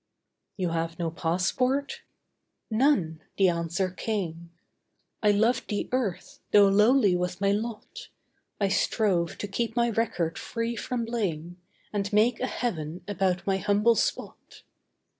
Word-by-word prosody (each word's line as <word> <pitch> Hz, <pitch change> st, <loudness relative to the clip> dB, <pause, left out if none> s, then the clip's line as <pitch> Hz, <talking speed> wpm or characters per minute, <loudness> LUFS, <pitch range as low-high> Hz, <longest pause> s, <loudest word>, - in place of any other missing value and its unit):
'You 185 Hz, -3 st, -1 dB
have 165 Hz, 0 st, -2 dB
no 170 Hz, -2 st, -2 dB
passport?' 250 Hz, -, 0 dB, 0.7 s
'None,' 215 Hz, -, +2 dB, 0.2 s
the 195 Hz, -2 st, +5 dB
answer 170 Hz, +2 st, -1 dB
came. 175 Hz, -5 st, -4 dB, 0.7 s
'I 210 Hz, -, +4 dB
loved 220 Hz, +5 st, +2 dB
the 205 Hz, -2 st, -2 dB
earth, 245 Hz, -8 st, -2 dB
tho' 205 Hz, -1 st, +7 dB
lowly 210 Hz, 0 st, +4 dB
was 180 Hz, 0 st, -2 dB
my 200 Hz, 0 st, +2 dB
lot. 220 Hz, +2 st, -4 dB, 0.5 s
I 200 Hz, -, +2 dB
strove 190 Hz, -4 st, +1 dB
to 205 Hz, -, -4 dB
keep 225 Hz, +3 st, -2 dB
my 235 Hz, -1 st, +2 dB
record 190 Hz, -7 st, -1 dB
free 230 Hz, 0 st, -3 dB
from 235 Hz, +1 st, -3 dB
blame, 175 Hz, -7 st, -3 dB, 0.4 s
And 200 Hz, -1 st, -2 dB
make 220 Hz, +3 st, +3 dB
a 255 Hz, -, -1 dB
heaven 175 Hz, -10 st, -3 dB
about 190 Hz, -2 st, 0 dB
my 195 Hz, -1 st, +1 dB
humble 205 Hz, +4 st, +3 dB
spot. -, -, -3 dB
200 Hz, 135 wpm, -27 LUFS, 175-230 Hz, 0.7 s, tho